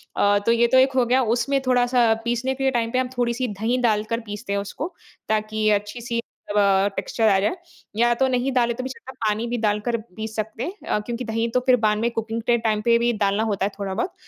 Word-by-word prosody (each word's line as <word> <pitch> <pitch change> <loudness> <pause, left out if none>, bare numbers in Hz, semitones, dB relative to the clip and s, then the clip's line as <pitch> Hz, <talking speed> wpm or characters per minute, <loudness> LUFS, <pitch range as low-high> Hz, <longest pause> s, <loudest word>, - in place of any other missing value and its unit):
अ, 205 0 +3
तो 230 - +4
ये 235 0 +4
तो - - +7
एक 265 +1 +4
हो 255 -2 +3
गया 255 +2 +3 0.2
उसमें 275 +3 +1
थोड़ा 250 -1 +4
सा 235 -2 +5
पीसने 240 +2 0
के 270 0 +1
टाइम 230 -2 -1
पे 255 - +1
हम 255 -1 -1
थोड़ी-सी 245 +1 0
दही 220 +4 -1
डालकर 215 +2 -1
पीसते 205 0 -5
हैं 200 - +1
उसको 290 - -5 0.4
ताकि 215 0 0
अच्छी-सी 235 +3 -4 0.3
तब 205 0 +1 0.4
टेक्सचर 225 -1 0
आ 195 -1 +4
जाए। 210 - 0 0.4
या 240 +2 +3
तो 265 +2 +2
नहीं 255 +1 0
डाले 240 -2 +2
तो 255 +2 -5
भी 260 - -4
चलता 265 0 -10
है - - -20
पानी 215 +2 0
भी 240 +1 -2
डालकर 215 +1 0 0.2
पीस 220 0 -6
सकते 220 +2 -4
हैं 360 - -4
अ, 210 - +1
क्योंकि 235 +3 -5
दही 225 0 -1
तो 250 - +3
फिर 255 -1 +6
बाद 210 0 +3
में 230 +2 +1
कुकिंग 225 0 -3
के 240 -1 +4
टाइम 220 -2 0
पे 235 +1 +4
भी 240 0 +2
डालना 205 0 +1
होता 205 -3 0
है - - 0
थोड़ा-बहुत। 200 - -2
230 Hz, 240 wpm, -23 LUFS, 215-245 Hz, 0.4 s, तो